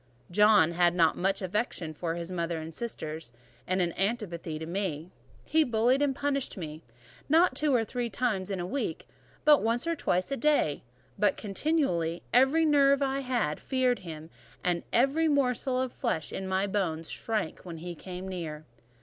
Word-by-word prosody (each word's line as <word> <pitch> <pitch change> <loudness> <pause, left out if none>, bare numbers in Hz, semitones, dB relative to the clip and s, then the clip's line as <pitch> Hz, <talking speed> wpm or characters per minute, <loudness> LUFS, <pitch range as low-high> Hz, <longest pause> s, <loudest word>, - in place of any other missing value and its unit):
John 210 -4 +5
had 175 0 +3
not 165 -3 +4
much 195 +2 0
affection 185 -4 -2
for 165 +1 -3
his 170 +1 -5
mother 170 -2 -2
and 160 +1 -7
sisters, 160 - -5 0.4
and 185 0 +2
an 170 -1 -1
antipathy 195 -7 -2
to 160 - -6
me. 170 -2 -3 0.3
He 315 +1 +3
bullied 245 +2 +2
and 280 -2 +1
punished 280 -3 -1
me; 155 -3 -6 0.5
not 330 +4 +4
two 300 -1 +1
or 225 -2 +2
three 240 +1 -3
times 205 -3 -1
in 195 - -2
the 175 - -3
week, 275 +10 -3 0.4
nor 295 -1 +7
once 230 +5 +1
or 335 0 0
twice 185 - 0
in 275 - -2
the - - -13
day, 290 - +2 0.4
but 210 - +3
continually: 195 - 0
every 270 +7 +5
nerve 280 -2 +4
I 270 0 0
had 245 - -1
feared 255 -2 +1
him, 160 -2 -9 0.3
and 175 -1 +1
every 275 +7 +3
morsel 260 -3 +1
of 260 -1 -1
flesh 155 -2 -2
in 190 - -4
my 190 +1 +1
bones 175 -5 -1
shrank 215 -8 -2
when 170 -3 -8
he 175 +2 -6
came 180 +2 -8
near. 160 -5 -5
195 Hz, 175 wpm, -29 LUFS, 170-260 Hz, 0.5 s, nor